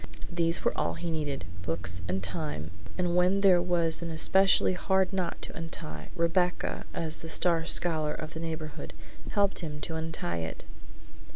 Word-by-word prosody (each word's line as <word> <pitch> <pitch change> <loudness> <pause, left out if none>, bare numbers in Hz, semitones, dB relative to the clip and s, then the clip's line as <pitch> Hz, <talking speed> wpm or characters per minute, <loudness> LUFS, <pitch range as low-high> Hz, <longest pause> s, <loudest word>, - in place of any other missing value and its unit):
These 170 -1 +1
were - - +2
all 85 0 0
he 170 - -3
needed, 145 - -2 0.2
books 85 +1 -1
and 95 +1 -1
time, 90 - -2 0.3
and 175 -1 +1
when 180 +2 +4
there 185 -3 +6
was 170 -2 +1
an 170 - -3
especially 185 +4 +4
hard 190 +1 +1
knot 185 -3 -1
to - - -5
untie, 75 - -6
Rebecca, 175 +1 +1
as 160 -1 -3
the 160 - -7
star 165 -1 +2
scholar 155 -3 +2
of 155 0 -6
the 160 - -5
neighborhood, 160 -2 -5 0.4
helped 200 -2 +2
him 150 -3 -5
to 165 - -3
untie 160 - -2
it. 80 -1 -5
165 Hz, 165 wpm, -29 LUFS, 150-175 Hz, 0.4 s, there